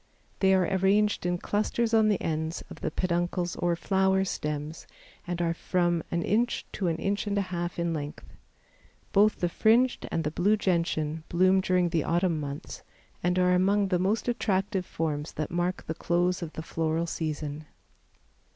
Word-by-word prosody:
They 190 -1 +4
are 185 - +3
arranged 195 +1 +2
in 175 0 0
clusters 220 +5 -1
on 220 -1 +5
the 205 -3 +2
ends 160 +1 -2
of - - -10
the - - -1
peduncles 175 +1 -1
or 175 -1 +1
flower 190 +2 +2
stems 150 -2 -4 0.4
and 175 0 -3
are 165 -1 +1
from 175 -1 0
an 170 0 -1
inch 235 +7 0
to 190 - -2
an 165 -1 0
inch 200 +5 -1
and 205 0 0
a - - +3
half 175 0 -3
in 170 -1 0
length. 150 -1 -5 0.9
Both 210 +2 +4
the 175 - +3
fringed 235 +8 +2
and 165 - 0
the 150 - -1
blue 205 +7 +2
Gentian 165 -5 0
bloom 185 +2 +4
during 180 -1 +2
the 165 -2 0
autumn 170 -1 +1
months 140 -1 -6 0.4
and 180 +1 +1
are 180 0 +4
among 195 +2 +3
the 180 -2 +2
most 200 +7 0
attractive 195 -5 0
forms 150 -1 -3
that 155 - -4
mark 175 +2 -1
the 160 - -3
close 175 +3 0
of 165 -2 -6
the 160 - -6
floral 165 0 -1
season. 155 -2 -4
175 Hz, 175 wpm, -28 LUFS, 165-190 Hz, 0.9 s, on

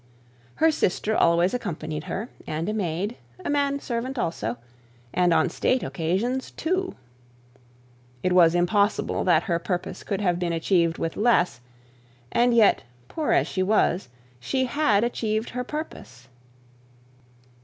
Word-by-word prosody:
Her 320 0 +4
sister 220 -4 0
always 170 +2 +3
accompanied 155 -9 -4
her 220 +5 -4 0.2
and 155 +2 -3
a 215 - -1
maid, 200 +2 -2 0.3
a - - 0
manservant 275 -3 -1
also, 120 - -2 0.6
and 180 -1 +3
on - - +4
state 255 -1 0
occasions, 195 +11 -1
two. 370 +3 -2 1.3
It 185 - +2
was 170 -2 +6
impossible 200 +4 +1
that 175 -4 +4
her 170 -1 0
purpose 175 0 -3
could 200 -2 -3
have 180 -4 +1
been 175 -1 -1
achieved 165 0 +1
with 165 - -3
less: 200 - +2 0.7
and 245 +1 +3
yet, 230 -3 +5 0.3
poor 315 -2 -1
as - - +4
she 185 - -2
was, 185 -5 +2 0.3
she 260 - 0
had 240 -6 +2
achieved 220 -2 -1
her 250 +1 -3
purpose. 245 - -7
200 Hz, 135 wpm, -25 LUFS, 170-245 Hz, 1.3 s, was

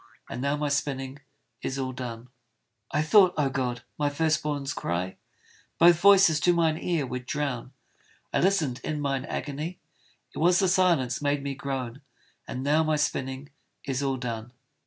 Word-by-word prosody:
And - - -4
now 140 +2 0
my 150 0 -1
spinning 140 -1 -2 0.4
is 135 - -3
all 130 -1 -2
done. 125 -1 -7 0.6
I 150 - +1
thought, 185 +3 +5
O 140 -3 +1
God! 125 -3 -2 0.2
my 145 -1 +2
first 155 +2 +1
born's 145 -2 -2
cry 90 +2 -3 0.6
Both 170 0 +6
voices 190 -5 +6
to 175 +4 +4
mine 165 -2 +2
ear 165 -5 0
would 125 -1 -6
drown: 135 -4 -3 0.6
I - - +2
listened 170 -10 +1
in 155 -1 -2
mine 135 -2 -1
agony, 150 +6 -4 0.6
It - - -6
was 175 +3 +4
the 190 - +3
silence 175 -10 +2
made 145 -1 0
me 140 -1 -2
groan! 135 -1 -4 0.5
And 130 - -4
now 150 +3 +3
my 155 0 +1
spinning 135 -1 -2 0.3
is 135 -1 -2
all 135 -1 0
done. 120 -1 -5
140 Hz, 165 wpm, -27 LUFS, 130-155 Hz, 0.6 s, Both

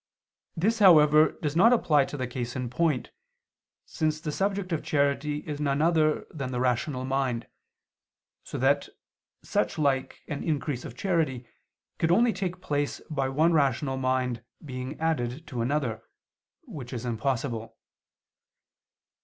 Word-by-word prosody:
This, 220 +7 +1
however, 155 -5 +7
does 150 0 -1
not 220 +8 +6
apply 150 - +4
to 145 - -7
the 130 - -2
case 120 -1 -5
in 125 -2 -3
point, 150 -1 0 0.7
since 155 -1 -1
the 155 -1 -4
subject 195 +2 -1
of 165 - 0
charity 145 0 0
is 145 -1 -5
none 140 -1 +1
other 155 -1 +2
than 135 -4 -5
the 125 - -2
rational 125 +1 0
mind, 130 -3 -1 1.0
so - - -6
that 140 +3 +2 0.5
such - - -1
like 140 -3 0
an 145 -2 -4
increase 145 -5 -2
of 120 - -9
charity 160 -10 0 0.5
could 165 - +2
only 225 +6 +4
take 185 -1 -4
place 145 -4 -1
by 135 -3 0
one 155 +5 +3
rational 135 -2 +1
mind 130 -3 -1 0.2
being 130 +1 -6
added 155 -2 -1
to 125 -6 -4
another; 120 -3 -1 0.6
which 150 - -8
is 120 0 -4
impossible. 115 -2 -2
145 Hz, 140 wpm, -27 LUFS, 130-160 Hz, 1.0 s, however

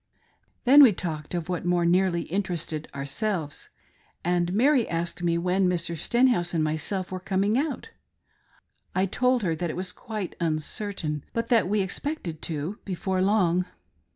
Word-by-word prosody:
Then 275 +4 +8
we 250 -7 +8
talked 160 -2 -4
of 170 -2 -3
what 180 -2 -2
more 175 -1 +2
nearly 175 0 +2
interested 170 -4 -3
ourselvesy 145 +4 -3 0.6
and 175 0 +1
Mary 250 +4 +3
asked 170 +1 -3
me 170 -1 +1
when 180 +2 +2
Mr. 170 -1 -1
Stenhouse 230 - +2
and 160 - +2
myself 160 +5 -2
were 185 - -3
coming 195 +3 0
out. 295 - -2 1.1
I 185 +1 +3
told 250 +4 +1
her 170 -4 +1
that 170 +1 -3
it - - -4
was 185 0 -3
quite 210 -3 -6
uncertain, 155 -1 -2
but 230 0 -2
that 230 -7 +3
we 210 0 +2
expected 190 - -3
to 160 +5 -4
before 190 0 -2
long. 185 -3 +2
180 Hz, 155 wpm, -26 LUFS, 170-210 Hz, 1.1 s, Then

